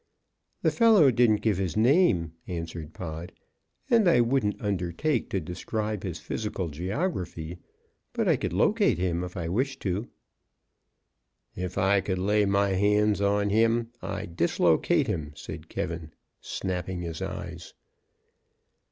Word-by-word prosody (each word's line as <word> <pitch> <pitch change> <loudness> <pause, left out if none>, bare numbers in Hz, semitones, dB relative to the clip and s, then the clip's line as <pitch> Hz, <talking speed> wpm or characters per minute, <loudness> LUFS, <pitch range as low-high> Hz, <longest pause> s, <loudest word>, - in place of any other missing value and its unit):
"The - - +4
fellow 215 - +6
didn't 115 -3 +3
give 105 -4 +1
his 90 -3 -2
name," 110 - +3
answered 85 -2 -5
Pod, 85 +1 -6 0.6
"and 225 -5 +4
I 125 - +5
wouldn't 120 -3 +1
undertake 100 - -1
to 95 - 0
describe 105 +5 -3
his 90 -4 -4
physical 95 +1 -4
geography, 90 - -3 0.5
but - - -1
I - - +5
could - - -3
locate - - +3
him 90 -1 -1
if 90 +2 -7
I 85 -2 -3
wished 130 +9 -1
to." 100 +4 -1 1.5
"If 90 0 -4
I 95 +1 +3
could 95 -1 -2
lay 105 +3 +2
my 100 0 +2
hands 105 +1 +2
on 100 0 +2
him, 115 +2 +2
I'd 85 - -5
dislocate 85 -1 +2
him," 75 -2 -3
said - - -9
K, - - -2 0.5
snapping 90 -1 -3
his 80 -1 -5
eyes. - - -6
100 Hz, 135 wpm, -27 LUFS, 90-110 Hz, 1.5 s, fellow